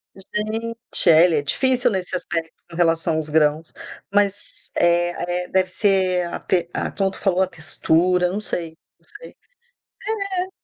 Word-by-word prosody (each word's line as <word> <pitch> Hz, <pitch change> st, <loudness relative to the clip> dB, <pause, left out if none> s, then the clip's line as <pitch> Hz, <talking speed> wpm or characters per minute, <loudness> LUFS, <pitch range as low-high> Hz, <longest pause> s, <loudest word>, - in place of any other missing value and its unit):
Gente 215 Hz, +4 st, -4 dB, 0.3 s
é, 160 Hz, +1 st, +7 dB
ele 170 Hz, -3 st, +2 dB
é -, -, +1 dB
difícil 250 Hz, -, +2 dB
nesse 190 Hz, -3 st, -3 dB
aspecto 165 Hz, -2 st, -3 dB, 0.2 s
com -, -, -11 dB
relação 165 Hz, -1 st, +1 dB
aos 155 Hz, -1 st, -1 dB
grãos, 155 Hz, +1 st, +1 dB, 0.4 s
mas, 205 Hz, -1 st, 0 dB
eh 175 Hz, 0 st, +3 dB
eh, 175 Hz, +1 st, -3 dB
deve 185 Hz, -1 st, +1 dB
ser 185 Hz, -3 st, +2 dB
a -, -, -4 dB
te 175 Hz, -2 st, 0 dB
a -, -, -2 dB
como 195 Hz, -1 st, -1 dB
tu -, -, -10 dB
falou, 190 Hz, -2 st, +1 dB
a 190 Hz, -, +2 dB
textura, 180 Hz, +1 st, +1 dB
não 195 Hz, +3 st, -3 dB
sei, 165 Hz, -6 st, -4 dB, 0.2 s
não -, -, -28 dB
sei -, -, -11 dB, 1.0 s
é. 370 Hz, 0 st, -2 dB
180 Hz, 165 wpm, -21 LUFS, 165-195 Hz, 1.0 s, é